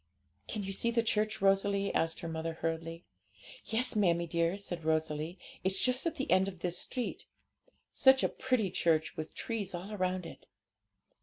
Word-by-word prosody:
'Can 210 Hz, -, -3 dB
you 195 Hz, 0 st, -4 dB
see 235 Hz, +4 st, +1 dB
the 230 Hz, 0 st, +2 dB
church, 215 Hz, -1 st, 0 dB
Rosalie?' 195 Hz, 0 st, +2 dB
asked 165 Hz, 0 st, 0 dB
her 170 Hz, -, -4 dB
mother 165 Hz, 0 st, -3 dB
hurriedly. 165 Hz, +1 st, -4 dB, 0.6 s
'Yes, 230 Hz, +2 st, 0 dB
mammie 170 Hz, -5 st, +3 dB
dear,' 170 Hz, +2 st, 0 dB
said 175 Hz, -4 st, -5 dB
Rosalie; 160 Hz, +2 st, -1 dB, 0.3 s
'it's 190 Hz, +1 st, +1 dB
just 255 Hz, +5 st, +2 dB
at 330 Hz, -, -2 dB
the 275 Hz, -, -3 dB
end 190 Hz, +1 st, +5 dB
of 185 Hz, -3 st, -7 dB
this 180 Hz, -1 st, 0 dB
street. 250 Hz, -2 st, -4 dB, 0.6 s
Such 265 Hz, -1 st, +5 dB
a -, -, +5 dB
pretty 250 Hz, -8 st, 0 dB
church, 160 Hz, -3 st, +1 dB
with 155 Hz, -, -6 dB
trees 205 Hz, -5 st, -3 dB
all 195 Hz, +5 st, -6 dB
round 185 Hz, -2 st, -1 dB
it!' -, -, -11 dB
185 Hz, 170 wpm, -32 LUFS, 165-215 Hz, 0.6 s, end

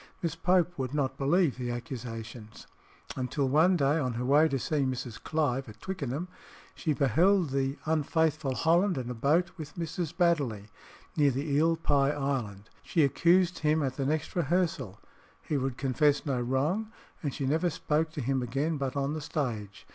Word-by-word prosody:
Miss 165 Hz, -2 st, 0 dB
Pope 175 Hz, 0 st, +1 dB
would 130 Hz, +2 st, -3 dB
not 135 Hz, -3 st, 0 dB
believe 145 Hz, +1 st, +2 dB
the 125 Hz, -1 st, -3 dB
accusations 115 Hz, -2 st, -7 dB, 0.6 s
till 140 Hz, +1 st, 0 dB
one 160 Hz, +7 st, +4 dB
day, 145 Hz, +1 st, +2 dB
on 130 Hz, -4 st, -1 dB
her 120 Hz, +2 st, -3 dB
way 145 Hz, +4 st, +5 dB
to 140 Hz, -, -1 dB
see 150 Hz, +4 st, -2 dB
Mrs. 130 Hz, -4 st, -2 dB
Clive 135 Hz, -5 st, -1 dB
at 105 Hz, -, -13 dB
Twickenham, 165 Hz, -3 st, -4 dB, 0.5 s
she 160 Hz, -, -2 dB
beheld 160 Hz, -, +3 dB
the 135 Hz, 0 st, -1 dB
unfaithful 155 Hz, -2 st, +1 dB
Holland 170 Hz, +4 st, +2 dB
in 125 Hz, -1 st, -3 dB
a -, -, -3 dB
boat 155 Hz, +9 st, +2 dB
with 150 Hz, -2 st, -8 dB
Mrs. 170 Hz, -1 st, -3 dB
Baddeley, 140 Hz, -, +1 dB, 0.5 s
near 145 Hz, -2 st, +4 dB
the 135 Hz, +3 st, -2 dB
Eel 160 Hz, +4 st, +3 dB
pie 140 Hz, -4 st, +2 dB
Island. 130 Hz, -9 st, -3 dB
She 165 Hz, -, +1 dB
accused 175 Hz, +5 st, +3 dB
him 155 Hz, 0 st, +2 dB
at 130 Hz, -1 st, -2 dB
the 135 Hz, -, -2 dB
next 155 Hz, 0 st, -2 dB
rehearsal, 160 Hz, -, 0 dB, 0.4 s
he 150 Hz, -, -4 dB
would 135 Hz, -2 st, -1 dB
confess 145 Hz, +2 st, +2 dB
no 135 Hz, -4 st, 0 dB
wrong, 150 Hz, -, 0 dB, 0.3 s
and 145 Hz, -, -2 dB
she 135 Hz, -, -4 dB
never 160 Hz, +6 st, +1 dB
spoke 155 Hz, 0 st, 0 dB
to 150 Hz, -, -4 dB
him 135 Hz, +1 st, 0 dB
again 140 Hz, +6 st, -1 dB
but 135 Hz, -1 st, -3 dB
on 140 Hz, +1 st, -1 dB
the 155 Hz, -, -4 dB
stage. 115 Hz, -, -4 dB
145 Hz, 175 wpm, -29 LUFS, 130-160 Hz, 0.6 s, way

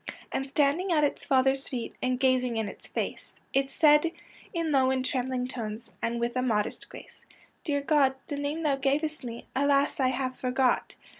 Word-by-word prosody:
And 270 Hz, -, -2 dB
standing 295 Hz, +6 st, +1 dB
at 305 Hz, -3 st, +3 dB
its 290 Hz, -, 0 dB
Father's 265 Hz, 0 st, +2 dB
feet, 245 Hz, -3 st, -4 dB
• -, -, -29 dB
And 255 Hz, 0 st, 0 dB
gazing 255 Hz, -3 st, +2 dB
in 220 Hz, -, 0 dB
his 200 Hz, -, -9 dB
face, -, -, -4 dB, 0.2 s
It 270 Hz, 0 st, +2 dB
said 300 Hz, +2 st, +4 dB, 0.4 s
in 335 Hz, -4 st, -1 dB
low 265 Hz, -2 st, +4 dB
and 260 Hz, -1 st, 0 dB
trembling 255 Hz, -1 st, -1 dB
tones, 230 Hz, -3 st, -6 dB
And 235 Hz, +1 st, -1 dB
with 235 Hz, +1 st, -1 dB
a 255 Hz, -, +1 dB
modest 220 Hz, -5 st, -1 dB
grace, -, -, -13 dB
^ -, -, -24 dB, 0.3 s
Dear 285 Hz, -4 st, 0 dB
God, 280 Hz, -2 st, +3 dB
the 290 Hz, -, -4 dB
name 290 Hz, +3 st, -2 dB
thou 285 Hz, -3 st, +2 dB
gavest 300 Hz, +3 st, 0 dB
me, 235 Hz, -1 st, -7 dB
Alas, 280 Hz, +1 st, +2 dB
I 260 Hz, -, +3 dB
have 255 Hz, 0 st, -1 dB
forgot.' 255 Hz, 0 st, 0 dB
265 Hz, 195 wpm, -28 LUFS, 255-285 Hz, 0.4 s, said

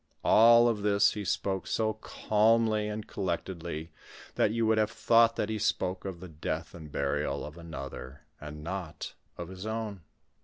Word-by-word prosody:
Of -, -, 0 dB
all 115 Hz, +1 st, +7 dB
this 105 Hz, -1 st, +3 dB
he 105 Hz, -, -4 dB
spoke 95 Hz, 0 st, -1 dB
so 110 Hz, -1 st, 0 dB
calmly 110 Hz, 0 st, +2 dB
and 105 Hz, 0 st, -4 dB
collect 95 Hz, -3 st, -3 dB
edly, 85 Hz, -3 st, -6 dB, 0.4 s
that -, -, +2 dB
you 115 Hz, +1 st, 0 dB
would 110 Hz, 0 st, +3 dB
have 105 Hz, -1 st, +2 dB
thought 115 Hz, 0 st, +4 dB
that 105 Hz, -, -1 dB
he 110 Hz, -1 st, -2 dB
spoke 95 Hz, -2 st, -1 dB
of 95 Hz, -3 st, -5 dB
the 90 Hz, -, -7 dB
death 80 Hz, +1 st, -4 dB
and 80 Hz, -3 st, -10 dB
burial 70 Hz, -1 st, -1 dB
of 75 Hz, -, -9 dB
another, 70 Hz, -5 st, -8 dB, 0.2 s
and 75 Hz, 0 st, -8 dB
not 85 Hz, -2 st, -5 dB, 0.2 s
of 85 Hz, 0 st, -6 dB
his 95 Hz, +2 st, -7 dB
own. 110 Hz, -4 st, -4 dB
100 Hz, 175 wpm, -29 LUFS, 85-110 Hz, 0.4 s, all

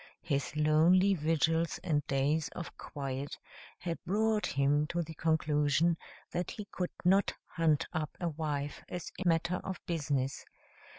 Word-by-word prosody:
His 145 Hz, -1 st, -1 dB
lonely 165 Hz, +6 st, +5 dB
vigils 160 Hz, 0 st, +1 dB
and 150 Hz, -5 st, +1 dB
days 140 Hz, +3 st, +1 dB
of 175 Hz, -, -6 dB
quiet 140 Hz, -1 st, -5 dB, 0.4 s
had 170 Hz, -2 st, -4 dB
brought 215 Hz, +2 st, +1 dB
him 145 Hz, +2 st, +2 dB
to 175 Hz, +2 st, -1 dB
the 160 Hz, 0 st, -8 dB
conclusion 155 Hz, 0 st, +2 dB, 0.4 s
that 175 Hz, 0 st, -2 dB
he 210 Hz, -, -6 dB
could 180 Hz, -1 st, -2 dB, 0.2 s
not 195 Hz, +3 st, +4 dB
hunt 165 Hz, -2 st, +2 dB
up 155 Hz, -2 st, -3 dB
a 175 Hz, -, 0 dB
wife 145 Hz, -2 st, -3 dB
as 175 Hz, -2 st, -5 dB
a -, -, 0 dB
matter 170 Hz, +2 st, +2 dB
of 190 Hz, 0 st, -5 dB
business. 145 Hz, -5 st, -1 dB
160 Hz, 140 wpm, -32 LUFS, 145-175 Hz, 0.4 s, lonely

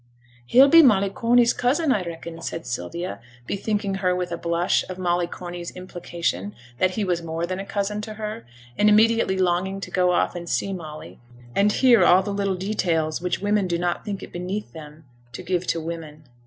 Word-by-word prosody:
'He'll 265 Hz, -, +7 dB
be 330 Hz, +4 st, +8 dB
Molly 200 Hz, -8 st, +4 dB
Corney's 235 Hz, +2 st, +3 dB
cousin, 280 Hz, +5 st, +1 dB
I 210 Hz, -, +2 dB
reckon,' 165 Hz, -1 st, -8 dB
said 165 Hz, 0 st, -5 dB
Sylvia, 145 Hz, -, -4 dB, 0.3 s
bethinking 200 Hz, -, -2 dB
her 180 Hz, -1 st, +2 dB
with 180 Hz, -1 st, -3 dB
a -, -, -1 dB
blush 170 Hz, +1 st, +1 dB
of 185 Hz, -, -6 dB
Molly 175 Hz, -1 st, 0 dB
Corney's 175 Hz, 0 st, -7 dB
implication 170 Hz, -, -4 dB, 0.2 s
that 185 Hz, 0 st, +2 dB
he 215 Hz, -, +1 dB
was 175 Hz, -3 st, 0 dB
more 165 Hz, 0 st, -3 dB
than 185 Hz, +2 st, -4 dB
a 195 Hz, -, -5 dB
cousin 205 Hz, +1 st, -2 dB
to 215 Hz, 0 st, -7 dB
her, 215 Hz, -, -5 dB, 0.4 s
and 210 Hz, -, +5 dB
immediately 220 Hz, -2 st, +4 dB
longing 185 Hz, +1 st, 0 dB
to -, -, -7 dB
go 180 Hz, -1 st, +2 dB
off 175 Hz, -, +1 dB
and 170 Hz, -1 st, -6 dB
see 195 Hz, -, -1 dB
Molly, 155 Hz, -4 st, -9 dB, 0.4 s
and 205 Hz, +1 st, +4 dB
hear 240 Hz, -4 st, +5 dB
all 180 Hz, +2 st, +6 dB
the 205 Hz, -, -3 dB
little 200 Hz, -1 st, 0 dB
details 170 Hz, -5 st, -1 dB
which 180 Hz, +1 st, -2 dB
women 205 Hz, -1 st, +1 dB
do 170 Hz, -1 st, 0 dB
not 175 Hz, 0 st, -2 dB
think 200 Hz, -2 st, -5 dB
it -, -, -11 dB
beneath 185 Hz, +4 st, -4 dB
them 155 Hz, -1 st, -11 dB, 0.3 s
to 185 Hz, -, -7 dB
give 180 Hz, 0 st, -1 dB
to 165 Hz, -, 0 dB
women. 160 Hz, -2 st, -7 dB
185 Hz, 195 wpm, -23 LUFS, 170-205 Hz, 0.4 s, be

